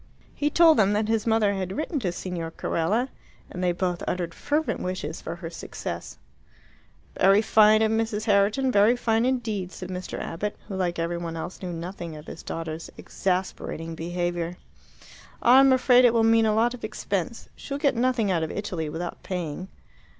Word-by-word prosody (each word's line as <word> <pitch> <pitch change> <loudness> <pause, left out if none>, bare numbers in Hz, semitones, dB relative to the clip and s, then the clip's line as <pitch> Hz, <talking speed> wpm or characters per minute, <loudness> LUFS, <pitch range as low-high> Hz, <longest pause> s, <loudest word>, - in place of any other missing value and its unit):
He 295 - 0
told 325 0 +6
them 200 -1 +4
that 210 +1 +1
his 225 0 0
mother 220 -2 +3
had 190 0 -3
written 310 -1 -2
to 190 -8 -1
Signor 175 -2 -4
Carella, 205 +10 -1 0.4
and 180 - -4
they 180 - +3
both 175 0 -2
uttered 175 -2 -2
fervent 295 - -1
wishes 185 -2 -4
for 165 - -5
her 165 -1 -7
success. - - -6 1.0
"Very 195 +3 +5
fine 215 0 +5
of 220 - +2
Mrs. 220 -1 0
Herriton, 210 +5 +3
very 210 +2 +5
fine 225 -1 +1
indeed," 220 -8 -1
said 185 -1 -8
Mr. 185 0 -5
Abbott, 205 +5 -4
who, 200 - -5
like 180 -2 -1
every 170 +1 -1
one 165 -1 -5
else, 175 +3 -6
knew 180 -2 -4
nothing 170 -1 -6
of 150 0 -10
his - - -9
daughter's 165 0 -5
exasperating 180 -3 -3
behaviour. 175 +1 -3 0.8
"I'm 265 +2 +6
afraid 255 -1 +5
it 240 -1 +5
will 225 - +4
mean 225 0 +4
a 215 - +2
lot 235 +2 +3
of 250 - -10
expense. 205 0 -3
She - - -12
will 280 - 0
get 285 -1 +2
nothing 235 -4 +1
out 170 -3 +1
of 160 - -2
Italy 175 -6 -3
without 170 +3 -5
paying." 180 -1 -4
195 Hz, 180 wpm, -26 LUFS, 175-225 Hz, 1.0 s, told